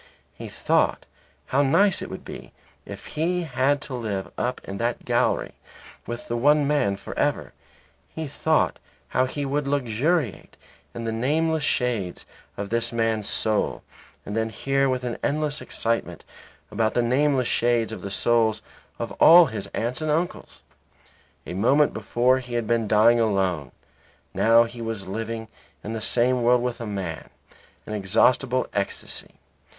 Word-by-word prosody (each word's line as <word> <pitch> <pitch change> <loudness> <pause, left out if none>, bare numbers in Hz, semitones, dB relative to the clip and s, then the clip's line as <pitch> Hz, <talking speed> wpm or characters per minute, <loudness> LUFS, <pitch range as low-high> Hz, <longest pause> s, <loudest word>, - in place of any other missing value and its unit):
He - - -9
thought - - +1 0.4
how 135 - +1
nice 190 +9 +3
it - - -6
would - - -8
be - - -10 0.3
if - - -9
he 175 +3 -1
had 140 -1 +1
to 145 - -8
live 105 -6 -4
up 125 - -2
in 100 0 -7
that 120 +1 -2
gallery - - +1 0.6
with 120 0 -6
that 120 - -2
one 145 +3 +4
man 140 -9 +1
for 100 - -9
ever. - - 0 0.6
He 160 -1 -5
thought 155 +2 +1 0.3
how 130 - +2
he 145 +2 -4
would 140 +1 -1
luxuriate 140 - -1 0.4
in 115 - -5
the 115 - -2
nameless 155 +7 0
shades 120 -10 -1 0.3
of 100 +1 -5
this 115 0 +1
man's 115 -3 0
soul 110 -1 0 0.4
and 105 - -5
then 110 0 0
hear 135 +4 0
with 130 -1 -1
an 120 -2 -4
endless 150 0 0
excitement 115 0 -2 0.5
about 110 +1 0
the 120 - +3
nameless 130 +1 +2
shades 120 -1 +1
of 110 - -7
the 100 - -5
souls 110 +1 +1 0.3
of - - -4
all 170 +2 +9
his 110 -7 -5
aunts 120 +8 -3
and 155 - -2
uncles. 165 +4 -2 0.8
A - - -6
moment 135 +10 +3
before 125 +2 +1
he 125 -2 -7
had 120 -1 0
been 115 -1 0
dying 110 +3 +5
alone. 95 - 0 0.6
Now 115 +1 +5
he 120 0 -8
was 115 -4 -4
living 115 +3 -5 0.4
in 110 - -5
the 110 - -4
same 125 +5 +1
world 120 +1 +3
with 125 -1 -3
a 115 - -4
man; 95 -6 -5 0.6
an 110 - -6
inexhaustible 120 +6 +2
ecstasy. 100 -1 -3
120 Hz, 155 wpm, -24 LUFS, 110-140 Hz, 0.8 s, all